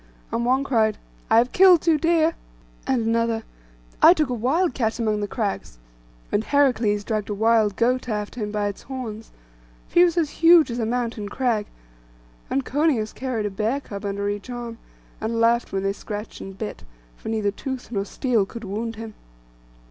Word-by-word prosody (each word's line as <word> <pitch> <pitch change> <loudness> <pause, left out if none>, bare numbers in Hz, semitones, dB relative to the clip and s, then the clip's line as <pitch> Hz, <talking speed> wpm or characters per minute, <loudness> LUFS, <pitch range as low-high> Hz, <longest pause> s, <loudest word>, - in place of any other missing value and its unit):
And 235 +1 -1
one 260 +2 +3
cried, 220 -6 +1 0.3
'I 225 - +5
have 245 +2 +4
killed 365 -3 +6
two 320 -2 +3
deer;' 330 0 +3 0.5
and 255 -4 +1
another, 230 0 0 0.6
'I 345 - +8
took 305 -5 0
a - - -1
wild 270 +9 +1
cat 225 -3 -1
among 215 -3 0
the 205 - -2
crags;' 200 - -3 0.5
and 205 - +1
Heracles 240 -7 +2
dragged 215 -1 -2
a 205 - -2
wild 220 -1 +3
goat 250 +3 +1
after 210 +2 -3
him 210 0 -3
by 210 -1 -1
its 200 - -6
horns, 230 -5 -7 0.6
for - - -26
he - - +9
was 350 -1 +2
as 315 -4 +1
huge 330 -4 +7
as 235 - -3
a 225 - 0
mountain 230 -3 -2
crag; 230 -4 0 0.8
and 270 0 -1
Coeneus 275 -7 +1
carried 250 -4 -3
a 205 - -2
bear 220 +7 -1
cub 200 -7 -8
under 200 0 -2
each 205 +4 -4
arm, 240 -2 -6 0.4
and 230 +1 -1
laughed 235 +1 +2
when 195 0 -2
they 195 0 0
scratched 210 +1 -7
and 195 0 -9
bit, 215 0 -6 0.3
for - - -8
neither 215 -2 0
tooth 260 +3 -6
nor 200 -4 -1
steel 225 -1 0
could 230 +2 -9
wound 220 +3 -4
him. 220 0 -8
230 Hz, 185 wpm, -23 LUFS, 210-260 Hz, 0.8 s, he